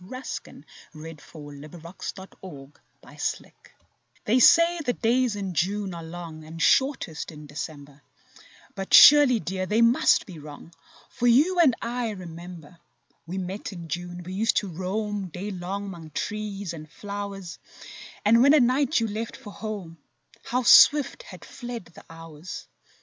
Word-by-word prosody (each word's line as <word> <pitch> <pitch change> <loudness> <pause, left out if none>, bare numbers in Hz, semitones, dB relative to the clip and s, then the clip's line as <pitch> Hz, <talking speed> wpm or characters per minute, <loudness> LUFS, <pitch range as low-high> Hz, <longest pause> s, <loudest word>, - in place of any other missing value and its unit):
SONGS 255 +8 -6
AND - - -15 0.3
DREAMS 155 -1 -10
June 145 -2 -11
and 170 -2 -10
December - - -7 0.7
They 235 +5 +3
say 335 +5 +6
the 245 - 0
days 240 0 +1
in 195 -3 -4
June 190 +4 -1
are 170 - -7
long 165 -1 -9
And 160 +2 -10
shortest 245 - +1
in 150 -1 -11
December; 145 -1 -8 0.7
But 195 -1 +1
surely, 285 -5 +8
dear, 185 -1 -4
they 220 +4 +3
must 235 +2 +4
be 175 -5 -11
wrong, 150 +3 -12 0.4
For 245 - -1
you 305 +10 +4
and 285 -8 +5
I 240 0 -2
remember 175 -3 -10 0.5
We 180 +3 -5
met 190 +3 -5
in 170 -2 -9
June, 175 +1 -5
we 185 +2 -8
used 220 +4 +1
to 200 - 0
roam 195 +3 -3
Day 185 +5 -6
long 195 +2 -5
hnong 160 -4 -12
trees 205 -3 -4
and 155 -2 -10
flowers, 200 -3 -7 0.7
And 230 +3 +5
when 280 +4 +6
at 285 - +5
night 265 +4 +2
you 225 - 0
left 220 +2 -5
for 205 - -11
home— 195 -7 -7 0.5
How 250 +1 -1
swift 295 - +6
had - - -12
fled 240 -5 -8
the - - -15
hours! 165 +1 -10
190 Hz, 150 wpm, -25 LUFS, 165-230 Hz, 0.7 s, surely